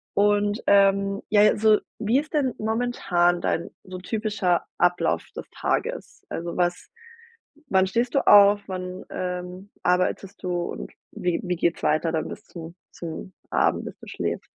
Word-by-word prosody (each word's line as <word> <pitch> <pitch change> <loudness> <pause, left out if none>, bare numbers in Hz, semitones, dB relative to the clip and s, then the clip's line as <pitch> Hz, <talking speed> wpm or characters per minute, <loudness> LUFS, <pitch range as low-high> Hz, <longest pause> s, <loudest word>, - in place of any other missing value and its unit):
Und, 205 +1 +2
ähm, 200 0 +4
ja, 205 -1 +5
also 215 0 +5 0.2
wie 230 +5 +2
ist 305 - -7
denn 265 -4 +1
momentan 215 -6 +1
dein 165 - -1
so 185 -1 -8
typischer 205 -2 -1
Ablauf 175 0 +1
das - - -7
Tages? - - -3
Also, 170 +1 -4
was 175 -1 -1 0.8
wann 190 0 +3
stehst 235 +5 -1
du 275 - +1
auf? 205 0 +8
Wann, 185 -1 -6
ähm, 180 +2 -5
arbeitest 185 +2 0
du 180 - -2
und - - -6 0.2
wie 180 -1 -1
wie 180 0 -1
geht 170 0 0
es - - -14
weiter 155 +2 +2
dann 160 -1 -1
bis 210 - -9
zum 170 -4 -10 0.2
zum 170 +2 -7 0.2
Abend, - - +1
bis - - -8
du - - -13
schläfst? - - -3
190 Hz, 155 wpm, -24 LUFS, 180-210 Hz, 0.8 s, auf